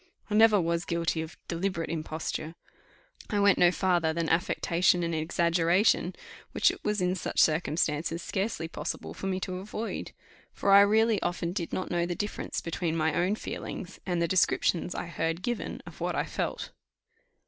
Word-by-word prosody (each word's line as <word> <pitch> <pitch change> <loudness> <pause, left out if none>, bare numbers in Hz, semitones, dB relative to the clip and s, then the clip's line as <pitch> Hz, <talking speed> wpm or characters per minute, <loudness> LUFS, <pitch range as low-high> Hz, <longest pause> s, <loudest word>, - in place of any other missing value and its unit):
I - - 0
never 215 -1 +6
was 170 -1 0
guilty 170 -1 -1
of 160 +1 -8
deliberate 170 -1 -2
imposture. 160 0 -4 0.7
I 205 - 0
went 200 -1 +4
no 175 - +7
farther 175 -3 +1
than 165 0 -1
affectation 175 +1 +2
and 170 0 -1
exaggeration, 170 +3 +2 0.4
which - - +4
it - - -11
was 210 -2 0
in 180 0 +2
such 185 - -3
circumstances 160 +1 +1
scarcely 190 -5 -2
possible 160 0 -5
for 195 - -5
me 190 -1 -1
to 185 0 -3
avoid; 215 +3 -5 0.4
for 200 - +1
I 200 0 +9
really 220 +1 +3
often 175 -1 -2
did 175 -4 -3
not 185 - -3
know 175 -1 +1
the 175 - -2
difference 205 +2 -3
between 165 -1 -2
my 160 -1 +1
own 185 +6 +1
feelings, 190 -3 -6
and 180 -2 -1
the 170 - +2
descriptions 180 0 +1
I - - -3
heard 165 +1 -2
given 240 0 -3
of - - -12
what - - -1
I - - +1
felt. - - -4
175 Hz, 170 wpm, -28 LUFS, 165-195 Hz, 0.7 s, I